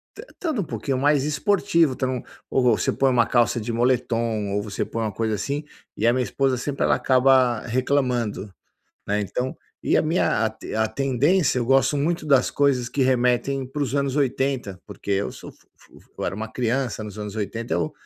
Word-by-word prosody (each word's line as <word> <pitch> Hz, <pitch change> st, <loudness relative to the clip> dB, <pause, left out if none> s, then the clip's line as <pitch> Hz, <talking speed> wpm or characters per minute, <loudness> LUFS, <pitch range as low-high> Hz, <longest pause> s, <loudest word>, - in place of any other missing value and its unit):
tan 440 Hz, -, -10 dB
estando 315 Hz, -, -2 dB
um -, -, -2 dB
pouquinho 140 Hz, -4 st, -3 dB
mais 145 Hz, +1 st, +3 dB
esportivo. 165 Hz, 0 st, +2 dB
Então, 130 Hz, -1 st, -2 dB, 0.3 s
ou 130 Hz, -, +1 dB
você 120 Hz, -3 st, +2 dB
põe 135 Hz, -1 st, +2 dB
uma 120 Hz, -3 st, +3 dB
calça 120 Hz, -1 st, +2 dB
de 115 Hz, +2 st, -3 dB
moletom, 115 Hz, -3 st, 0 dB
ou 105 Hz, 0 st, 0 dB
você 100 Hz, -2 st, -3 dB
põe 115 Hz, -, -4 dB
uma 110 Hz, -, -1 dB
coisa 110 Hz, +1 st, -1 dB
assim, 140 Hz, +8 st, -3 dB, 0.3 s
e 110 Hz, -, +1 dB
a 120 Hz, -, +5 dB
minha 130 Hz, 0 st, +1 dB
esposa 135 Hz, 0 st, 0 dB
sempre, 140 Hz, +3 st, -2 dB
ela -, -, +3 dB
acaba 130 Hz, -3 st, +3 dB
reclamando, 125 Hz, -5 st, 0 dB, 0.6 s
né. 105 Hz, +1 st, 0 dB
Então 125 Hz, -, -3 dB, 0.3 s
e -, -, +2 dB
a -, -, +3 dB
minha 155 Hz, -7 st, +1 dB
a -, -, -2 dB
te 110 Hz, -, -9 dB
a 110 Hz, 0 st, +1 dB
tendência, 140 Hz, -, +1 dB
eu 120 Hz, -, 0 dB
gosto 135 Hz, +2 st, +3 dB
muito 155 Hz, +2 st, -1 dB
das 135 Hz, -4 st, +4 dB
coisas 135 Hz, -4 st, +1 dB
que 135 Hz, +2 st, 0 dB
remetem 130 Hz, +1 st, +1 dB
para 145 Hz, +3 st, -3 dB
os 135 Hz, -1 st, -2 dB
anos 140 Hz, -1 st, 0 dB
80, 130 Hz, -8 st, -1 dB
porque 100 Hz, 0 st, -8 dB
eu 100 Hz, +1 st, 0 dB
sou -, -, -11 dB
fu -, -, -29 dB
fu -, -, -20 dB
fu -, -, -26 dB
eu -, -, -3 dB
era 90 Hz, -, -2 dB
uma 110 Hz, +2 st, -5 dB
criança 120 Hz, -1 st, -1 dB
nos 105 Hz, 0 st, -9 dB
anos 105 Hz, 0 st, -6 dB
80, 110 Hz, +3 st, -3 dB
eu 155 Hz, -, -1 dB
125 Hz, 205 wpm, -23 LUFS, 115-140 Hz, 0.6 s, a